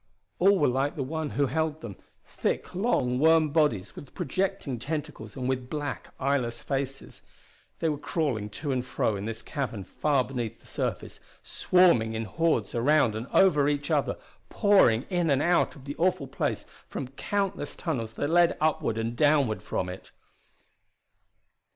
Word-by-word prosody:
All 195 +2 +5
were 145 - +3
like 135 +5 0
the 140 - -2
one 160 +3 -3
who 145 - +4
held 155 +3 -1
them, 105 -5 -7 0.3
thick - - -3
long 175 - +1
worm 160 0 +5
bodies 145 - +1
with 140 - -11
projecting 185 -6 -2
tentacles 150 +3 -5
and 130 -2 -3
with 130 -1 -2
black 145 -1 -4
eyeless 130 -4 0
faces. 135 -1 -4 0.6
They 165 - -1
were 150 -2 -1
crawling 135 -11 -1
to 140 +8 -4
and 125 -2 0
fro 120 -3 -1
in 100 +1 -5
this 115 0 -4
cavern 130 -9 -4
far 140 +7 +1
beneath 120 -4 -5
the - - -24
surface, - - -4 0.2
swarming 170 -12 +3
in 110 0 -2
hordes 120 - 0
around 125 -1 +3
and 110 +4 -5
over 150 -7 +4
each 145 0 -2
other, - - +1 0.3
pouring 195 - +4
in 175 -3 +1
and 135 -2 +3
out 170 +2 +2
of 135 -3 -14
the 145 +1 -5
awful 180 -3 +1
place 135 - -2 0.2
from 130 - -5
countless 195 +2 -2
tunnels 115 -9 -3
that 145 - -2
led 175 0 +4
upward 155 -7 +1
and 115 +1 -2
downward 145 -5 +3
from 90 - -3
it! 90 +1 -8
140 Hz, 165 wpm, -27 LUFS, 120-160 Hz, 0.6 s, All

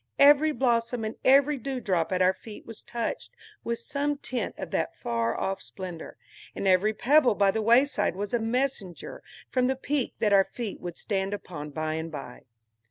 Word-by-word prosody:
Every 290 +2 +6
blossom 235 -4 0
and 215 - -4
every 280 +2 +5
dewdrop 200 -11 -1
at 185 0 +2
our 185 +1 +4
feet 210 +2 -11
was 225 -1 -9
touched 235 - -4 0.3
with 235 0 -2
some 285 +4 -2
tint 250 -5 -3
of - - -6
that - - -1
far 115 0 -1
off 195 0 -2
splendor, 180 -4 -8 0.4
and 195 - -2
every 190 +3 +4
pebble 250 +1 +4
by 200 -1 +4
the 220 - -1
wayside 235 - +3
was 205 +3 -4
a 240 - +2
messenger 225 -6 -2 0.3
from 255 -1 +1
the 265 - +1
peak 270 0 -2
that 210 -2 +2
our 195 -1 +6
feet 230 -5 -5
would 175 -1 -6
stand 195 -1 -1
upon 150 -7 -8
by 155 +2 -3
and 160 +1 -4
by. 135 -5 -8
220 Hz, 180 wpm, -27 LUFS, 185-255 Hz, 0.4 s, Every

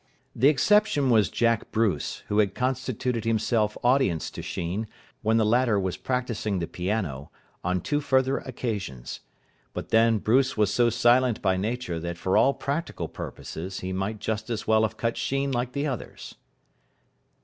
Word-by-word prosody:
The 130 - +4
exception 150 -2 +3
was 110 -3 +4
Jack 115 -1 +1
Bruce, 105 -9 0
who 105 - +1
had 100 -2 +2
constituted 125 -2 -1
himself 110 -1 +1
audience 120 - +2
to - - -7
Sheen, 95 +6 -3 0.3
when 110 +1 +2
the 110 - +3
latter 115 -1 +3
was 95 -2 -2
practising 115 -6 -2
the 85 - -1
piano, 90 -7 -3 0.3
on 90 0 0
two 145 - -1
further 130 -1 +2
occasions. 100 - -5 0.6
But - - -5
then 115 0 +4
Bruce 130 +5 +2
was 105 -1 +2
so 120 -1 +4
silent 120 0 +3
by 95 -2 +3
nature 100 -3 -2
that 85 +1 -5
for 95 +2 0
all 140 - +4
practical 150 +5 -3
purposes 95 +4 -7
he 95 0 -4
might 95 +4 -2
just 110 +1 -3
as 115 -3 -3
well 110 0 +4
have 110 0 -1
cut 115 0 -1
Sheen 135 0 -1
like 125 0 -2
the 140 +1 -1
others. 135 -6 -5
115 Hz, 160 wpm, -26 LUFS, 100-130 Hz, 0.6 s, The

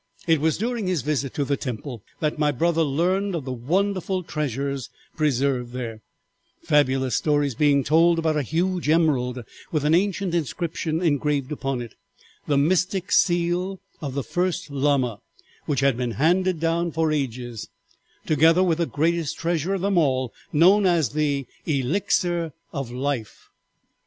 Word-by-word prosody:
"'It 160 -3 +3
was 160 -1 +1
during 230 -1 -2
his 180 -8 0
visit 140 -2 -1
to 145 - -2
the 140 - +1
temple 125 -2 -6 0.2
that 150 -1 -1
my 150 -1 +3
brother 165 +4 +1
learned 180 +6 +1
of 155 -6 -4
the 130 - -3
wonderful 185 +8 -1
treasures 140 -4 -3 0.3
preserved 135 -4 0
there, 115 -3 -5 0.6
fabulous 135 -3 +2
stories 145 -3 +1
being 140 +2 +3
told 165 +4 +4
about 160 -1 +1
a 150 - +1
huge 170 +4 -1
emerald 130 -7 +2 0.3
with 150 -3 0
an 150 - +3
ancient 195 0 +1
inscription 165 0 -2
engraved 145 -3 0
upon 135 -4 -2
it, 115 - -11 0.5
the 145 - +2
mystic 180 +5 +1
seal 175 +2 +2 0.2
of 140 -4 -5
the 140 - -1
first 180 - -2
Lama, 135 -6 +1 0.5
which 140 -3 0
had 135 -2 +3
been 125 -2 -2
handed 180 +5 +2
down 165 +1 0
for 160 0 0
ages, 125 -6 -3 0.6
together 160 +4 +4
with 170 -3 +1
the 170 - +1
greatest 165 +1 0
treasure 170 +2 -1
of 190 - -3
them 195 -2 +2
all, 130 -5 +1 0.2
known 190 +6 +5
as 165 -8 +2
the 145 0 -1 0.2
Elixir 165 +3 0 0.2
of 135 -5 -4
Life. 125 -3 -4
150 Hz, 150 wpm, -24 LUFS, 135-170 Hz, 0.6 s, known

